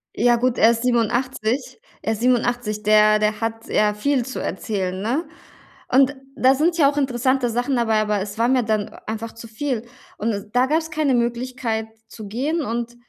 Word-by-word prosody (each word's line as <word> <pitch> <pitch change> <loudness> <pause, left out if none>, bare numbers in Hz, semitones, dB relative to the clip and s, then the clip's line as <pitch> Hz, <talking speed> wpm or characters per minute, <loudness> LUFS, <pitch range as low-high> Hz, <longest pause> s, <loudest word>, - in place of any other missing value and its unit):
Ja 240 +1 +3
gut, 250 0 0
er 225 - +6
ist 230 0 -2
87. 245 +1 0 0.2
Er 220 - -1
ist 220 - -6
87. 245 -3 0
Der 215 0 +5
der 210 0 0
hat, 225 0 -3
ja, 210 0 +2
viel 255 +3 0
zu 260 - -5
erzählen, 190 -3 -3
ne? 255 - -1 0.6
Und 270 +2 +4 0.2
da 260 +1 +4
sind 330 +4 +1
ja 285 -4 +5
auch 290 - -9
interessante 260 -2 +1
Sachen 245 +4 -1
dabei, 225 -3 +2
aber 210 -1 0
es 200 +2 -6
war 230 - +2
mir 255 -1 +3
dann 215 -2 -1 0.2
einfach 225 +1 -5
zu 230 0 -11
viel. 230 +1 -3 0.3
Und 210 -1 -3
da 255 +1 +4
gab's 320 +2 0
keine 305 -4 +1
Möglichkeit 235 -2 -2 0.2
zu 215 -2 -10
gehen, 280 +10 -1
und 235 0 -3
235 Hz, 185 wpm, -22 LUFS, 220-260 Hz, 0.6 s, er